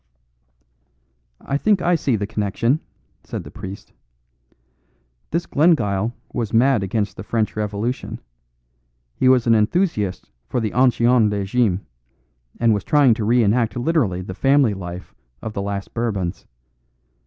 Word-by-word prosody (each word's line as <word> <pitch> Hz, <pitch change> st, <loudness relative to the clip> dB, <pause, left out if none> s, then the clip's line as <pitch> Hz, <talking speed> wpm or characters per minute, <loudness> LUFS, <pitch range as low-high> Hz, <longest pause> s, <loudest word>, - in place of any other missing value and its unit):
"I 140 Hz, +1 st, -2 dB
think 210 Hz, +1 st, +3 dB
I 175 Hz, 0 st, +1 dB
see 140 Hz, -7 st, +1 dB
the 105 Hz, -1 st, -2 dB
connection," 110 Hz, +6 st, 0 dB, 0.4 s
said -, -, -6 dB
the -, -, -11 dB
priest. 95 Hz, +1 st, -9 dB, 1.4 s
"This 170 Hz, +2 st, -1 dB
Glengyle 115 Hz, -, +2 dB, 0.2 s
was 115 Hz, -4 st, -2 dB
mad 125 Hz, -1 st, +4 dB
against 100 Hz, +1 st, -2 dB
the 95 Hz, -, -6 dB
French 110 Hz, 0 st, -1 dB
Revolution. 105 Hz, +4 st, -3 dB, 1.0 s
He 130 Hz, -, +3 dB
was 130 Hz, -2 st, +4 dB
an 115 Hz, -, +4 dB
enthusiast 105 Hz, -, 0 dB, 0.2 s
for 125 Hz, -, -1 dB
the 110 Hz, -3 st, -2 dB
ancien 120 Hz, -3 st, +4 dB
regime, 100 Hz, -1 st, 0 dB, 0.7 s
and 115 Hz, -1 st, +4 dB
was 100 Hz, -, -1 dB
trying 145 Hz, -6 st, +4 dB
to 110 Hz, 0 st, -3 dB
re 120 Hz, +2 st, +4 dB
enact 110 Hz, 0 st, +1 dB
literally 120 Hz, -, 0 dB
the 95 Hz, -, -6 dB
family 135 Hz, 0 st, +3 dB
life 90 Hz, -1 st, -8 dB, 0.3 s
of 110 Hz, -, -6 dB
the 100 Hz, -, -3 dB
last 100 Hz, 0 st, -4 dB
Bourbons. 100 Hz, -7 st, -3 dB
115 Hz, 135 wpm, -21 LUFS, 100-130 Hz, 1.4 s, mad